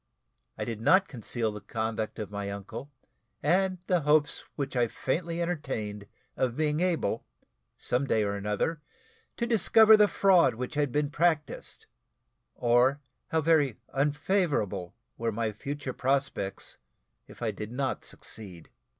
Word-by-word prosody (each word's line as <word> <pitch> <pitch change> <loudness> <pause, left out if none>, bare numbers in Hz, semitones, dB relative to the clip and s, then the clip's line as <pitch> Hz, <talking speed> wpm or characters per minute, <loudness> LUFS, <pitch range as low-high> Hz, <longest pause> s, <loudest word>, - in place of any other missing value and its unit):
I - - -3
did 115 -2 -5
not 190 - +5
conceal 115 -2 -3
the 105 0 -8
conduct 110 +1 -3
of 105 -3 -5
my 100 -1 -4
uncle, 105 +7 -7 0.5
and 185 +5 +2
the 180 -2 +2
hopes 150 0 +2
which 140 -2 -3
I 120 -1 +3
faintly 165 +8 -2
entertained 110 -12 -4 0.3
of 125 -2 0
being 150 0 +1
able, 180 -2 0 0.5
some 130 +3 0
day 110 -4 +2
or 100 -1 -1
another, 105 +10 -1 0.6
to 235 - 0
discover 220 -1 +6
the 210 -1 +6
fraud 190 - +4
which 125 +2 -5
had 145 -3 0
been 145 +1 0
practised, 160 -1 -1 0.7
or 125 +4 +3 0.3
how 160 - +1
very 150 -7 +3 0.2
unfavourable 145 - 0 0.2
were 115 0 0
my 110 0 -1
future 135 +5 -5
prospects 135 -7 -2 0.5
if - - -10
I 110 - +1
did 105 +2 -7
not 130 +1 -2
succeed. 90 -7 -6
135 Hz, 140 wpm, -29 LUFS, 110-160 Hz, 0.7 s, discover